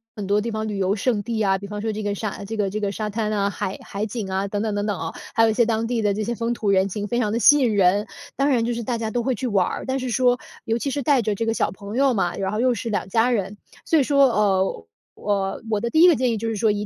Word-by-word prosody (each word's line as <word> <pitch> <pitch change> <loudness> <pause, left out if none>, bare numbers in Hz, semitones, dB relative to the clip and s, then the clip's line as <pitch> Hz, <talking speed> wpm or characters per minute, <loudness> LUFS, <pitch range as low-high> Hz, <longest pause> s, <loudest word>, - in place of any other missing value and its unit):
很 205 -3 -5
多 205 +1 +2
地 230 +1 -3
方 215 0 -3
旅 205 -2 -3
游 195 +1 +1
胜 220 0 0
地 225 -2 -2
啊， 195 -1 +2
比 200 +1 -8
方 210 0 -5
说 220 0 -1
这 215 0 -5
个 205 0 -1
沙 205 -1 -5
这 225 +2 -5
个 200 -2 0
这 215 +2 -3
个 200 -1 -1
沙 210 +1 -3
滩 215 0 -2
呐， 200 -1 +1
海 190 -1 -4
海 200 +2 -4
景 215 -3 -5
啊， 190 +1 -1
等 205 +1 -2
等 215 -2 -1
等 205 0 -1
等 205 -3 -1
哦。 165 0 -4 0.2
还 225 - +4
有 225 - +5
一 - - +1
些 235 0 +3
当 225 0 0
地 235 -2 -1
的 205 -1 +1
这 215 +1 -2
些 235 +2 -2
风 230 +1 -1
土 210 -3 -2
人 190 0 +3
情 205 +2 -4
非 240 - -1
常 210 -3 0
地 230 - 0
吸 295 +4 +7
引 240 -5 +2
人， 200 +2 +3 0.3
当 275 +1 +1
然 235 -4 +2
就 240 - -1
是 235 0 -4
大 235 +1 -2
家 225 -1 -3
都 240 +1 -1
会 260 -1 0
去 260 - -3
玩 200 -5 +2
儿。 - - -4
但 265 +1 -1
是 255 -1 -3
说， 245 +1 +3 0.3
尤 225 +1 0
其 275 - -2
是 285 - -2
带 270 -2 +3
着 215 -1 -1
这 230 - -2
个 225 - +1
小 170 - 0
朋 200 +3 -8
友 270 -1 +4
嘛， 175 -4 0
然 195 0 -2
后 215 - -2
又 250 0 +3
是 230 +1 -4
两 205 -3 -2
家 230 +5 +2
人， 205 -2 -2 0.3
所 325 - +3
以 - - +4
说， 280 0 +4
呃， 190 - +1 0.3
呃， 195 -2 -2
我 210 -2 0
的 235 - -1
第 315 +6 +3
一 360 - +9
个 340 - +6
建 250 -1 +1
议 225 - -1
就 230 - -3
是 225 - -1
说 215 +1 +2
215 Hz, 345 characters per minute, -23 LUFS, 200-235 Hz, 0.3 s, 一